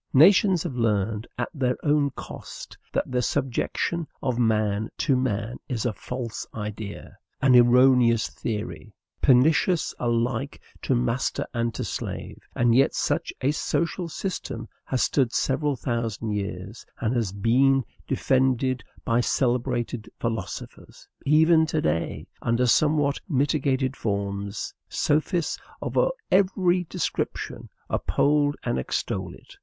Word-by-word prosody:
Nations 185 +3 +6
have 170 -6 -4
learned 110 -2 0
at 120 - -2
their 125 -4 0
own 145 -1 +3
cost - - -9 0.2
that - - -1
the 125 -1 +1
subjection 145 +5 -1 0.2
of 125 -3 0
man 110 -2 +1
to 140 -4 +2
man 120 -2 -1
is 120 -4 -2
a 120 - 0
false 125 0 -5
idea, 105 -1 -6 0.2
an 135 -2 +5
erroneous 120 -1 +5
theory, 110 -1 -5 0.3
pernicious 155 +6 +4
alike 120 +3 -1 0.2
to 130 - +1
master 120 +1 0
and 115 -1 0
to - - -3
slave. - - -5 0.2
And 120 -1 +3
yet 135 +3 +4
such - - 0
a 135 - +2
social 170 +3 -1
system 135 - -4 0.2
has 130 - 0
stood 130 -5 +2
several 140 +3 0
thousand 115 -3 -2
years, 100 0 -4 0.2
and 115 +3 0
has 115 -6 0
been 130 +7 +3 0.2
defended 130 -2 +1 0.2
by 115 +1 +2
celebrated 120 -3 0
philosophers; 115 -1 -5 0.2
even 160 +2 +5
to 155 - 0
day, 85 - -1 0.2
under 115 +2 +1
somewhat 145 +2 +3
mitigated 135 -2 +1
forms, 100 -1 -3 0.2
sophists 155 +2 0 0.2
of - - -5 0.4
every 185 -2 +3
description - - -3 0.2
uphold 145 0 +2
and 65 - 0
extol - - -3
it. - - -17
125 Hz, 125 wpm, -25 LUFS, 115-145 Hz, 0.4 s, Nations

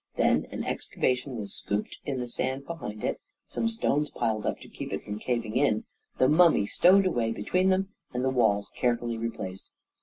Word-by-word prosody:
Then - - +3
an - - -4
excavation 125 0 -1
was 100 -2 -4
scooped 105 +1 -2
in 135 -2 -2
the 125 - -2
sand 130 +3 -2
behind 125 -11 -6
it, - - -1 0.2
some 230 - -1
stones 150 -10 +1
piled 110 -3 -1
up - - -1
to - - -11
keep - - -7
it - - -3
from 105 +1 -5
caving 115 -2 -2
in, 125 -5 +2 0.3
the 130 - +5
mummy 160 - +5
stowed 190 - +5
away 120 -11 +1
between 180 - +1
them, 190 +1 +2 0.2
and 125 +1 -1
the 130 - +2
wall 110 -5 +3
carefully 120 -1 0
replaced. 95 -5 -5
125 Hz, 185 wpm, -28 LUFS, 110-150 Hz, 0.3 s, the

